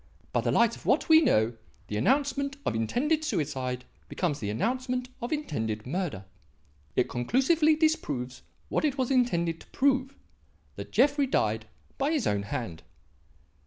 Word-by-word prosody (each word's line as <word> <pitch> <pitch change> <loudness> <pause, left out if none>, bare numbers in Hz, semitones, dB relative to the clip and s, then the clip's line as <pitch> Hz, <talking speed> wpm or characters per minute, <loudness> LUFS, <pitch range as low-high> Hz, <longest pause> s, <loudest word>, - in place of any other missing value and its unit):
By - - +2
the - - 0
light 235 -1 +3
of - - -12
what 300 - +2
we 320 0 +8
know, 115 - +3 0.3
the 105 - -5
announcement 280 - +1
of - - +1
intended 265 - 0
suicide 130 - -2 0.2
becomes 155 -6 -1
the 105 - -3
announcement 250 - -1
of 240 - -4
intended 110 - -2
murder. 145 - -3 0.7
It - - +2
conclusively 285 - +3
disproves 145 - -1 0.3
what - - -1
it 290 -3 +1
was 260 0 0
intended 170 -11 +1
to - - -15
prove; 270 0 +1 0.6
that - - -8
Jeffrey 285 -1 +3
died 110 - 0 0.3
by 280 +1 +2
his 295 -6 0
own 100 -1 +1
hand." 100 -4 -5
240 Hz, 150 wpm, -28 LUFS, -, 0.7 s, we